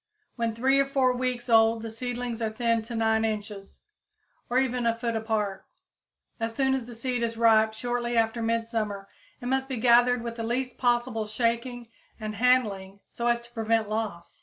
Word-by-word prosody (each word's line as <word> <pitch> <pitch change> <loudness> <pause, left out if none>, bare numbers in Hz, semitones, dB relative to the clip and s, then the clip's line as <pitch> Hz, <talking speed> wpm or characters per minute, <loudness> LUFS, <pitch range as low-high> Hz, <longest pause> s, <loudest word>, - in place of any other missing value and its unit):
When 230 -2 -1
three 265 +4 +3
or 275 - +2
four 260 -2 +2
weeks 250 -1 -2
old 225 -1 +4
the 225 - -5
seedlings 245 0 -4
are 220 - 0
thinned 230 0 0
to 235 0 -6
9 220 0 +2
inches, 210 -2 -4 0.7
or 245 - +1
even 250 -2 +1
a 230 - +2
foot 230 -1 -2
apart. 210 -3 -2 0.7
As 225 0 -3
soon 265 -1 +2
as 260 -3 -2
the 240 - -9
seed 245 +1 -2
is 230 -1 -2
ripe, 220 -1 +4
shortly 240 0 -2
after 225 +1 +1
midsummer, 225 -3 -2 0.3
it - - -9
must 265 +1 0
be 260 - -3
gathered 240 +1 +4
with 235 0 -5
the 230 - -3
least 250 +2 -2
possible 240 -3 +1
shaking 235 +2 -1 0.3
and 215 -1 -4
handling, 205 -5 +1
so 235 - -2
as 235 0 +1
to 240 0 -16
prevent 225 -2 0
loss. 215 -6 -4
230 Hz, 185 wpm, -27 LUFS, 220-245 Hz, 0.7 s, old